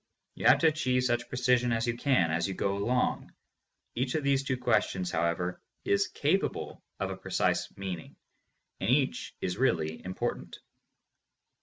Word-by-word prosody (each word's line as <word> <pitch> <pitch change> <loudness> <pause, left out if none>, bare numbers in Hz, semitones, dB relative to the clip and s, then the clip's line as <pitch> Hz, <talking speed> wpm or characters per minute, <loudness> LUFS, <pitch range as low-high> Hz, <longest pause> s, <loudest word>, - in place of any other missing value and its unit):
You - - 0
have 130 +3 +8
to 165 - +6
achieve 130 -5 +1
such 120 -1 0
precision 125 -1 +2
as 115 -1 +1
you 120 -1 -1
can, 120 - +2
as 85 +2 0
you 95 - -4
go 100 +1 0
along. 125 +5 0 0.6
Each 125 +3 -1
of 155 - 0
these 140 -1 +2
two 130 -1 -1
questions, 110 -7 +1
however, 85 +2 -1 0.2
is 100 - +2
capable - - -1 0.2
of - - -2
a - - -4
precise - - 0
meaning, 95 -4 -6 0.6
and 95 - -1
each 135 +1 +1
is 90 +1 -2
really 80 -11 0
important. 95 0 -4
120 Hz, 155 wpm, -29 LUFS, 95-130 Hz, 0.6 s, have